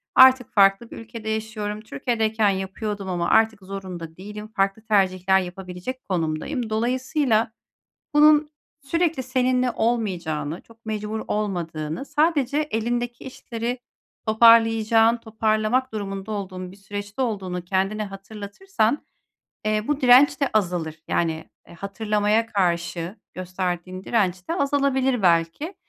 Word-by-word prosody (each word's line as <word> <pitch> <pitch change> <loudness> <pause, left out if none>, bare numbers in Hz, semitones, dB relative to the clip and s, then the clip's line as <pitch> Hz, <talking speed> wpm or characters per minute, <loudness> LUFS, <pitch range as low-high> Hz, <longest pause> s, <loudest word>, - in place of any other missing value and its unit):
Artık 260 -1 +7
farklı 195 +3 +4
bir - - -8
ülkede 225 -1 -7
yaşıyorum. 215 -1 -3
Türkiye'deyken 220 -2 0
yapıyordum 195 +1 -3
ama 175 -1 -1
artık 220 -2 +3
zorunda 185 -4 -7
değilim. 210 +3 -8
Farklı 195 -1 0
tercihler 190 -3 +2
yapabilecek 185 +7 -6
konumdayım. 185 - -2
Dolayısıyla 245 +1 +1 0.6
bunun 300 0 +6 0.3
sürekli 325 0 0
seninle 255 0 +1
olmayacağını, 180 -10 -1
çok 230 0 -22
mecbur 215 0 -3
olmadığını, 170 - -3
sadece 295 -2 +1
elindeki 240 -4 -2
işleri 240 -1 -4 0.5
toparlayacağın, 225 0 +5
toparlamak 220 +2 0
durumunda 200 -1 -4
olduğun 185 -3 -5
bir - - -14
süreçte 205 +3 -5
olduğunu 190 -7 -3
kendine 195 +3 0
hatırlatırsan, 215 - -3 0.6
eee, 215 0 0
bu 295 -1 0
direnç 260 +3 +6
de 280 - +2
azalır. 175 -6 0
Yani, 160 -1 -1 0.2
eee, - - -13
hatırlamaya 210 +3 0
karşı 175 -2 -1 0.2
gösterdiğin 185 0 -4
direnç 185 -5 0
de - - 0
azalabilir 275 - +1
belki. 170 - +1
215 Hz, 115 wpm, -24 LUFS, 190-240 Hz, 0.6 s, Artık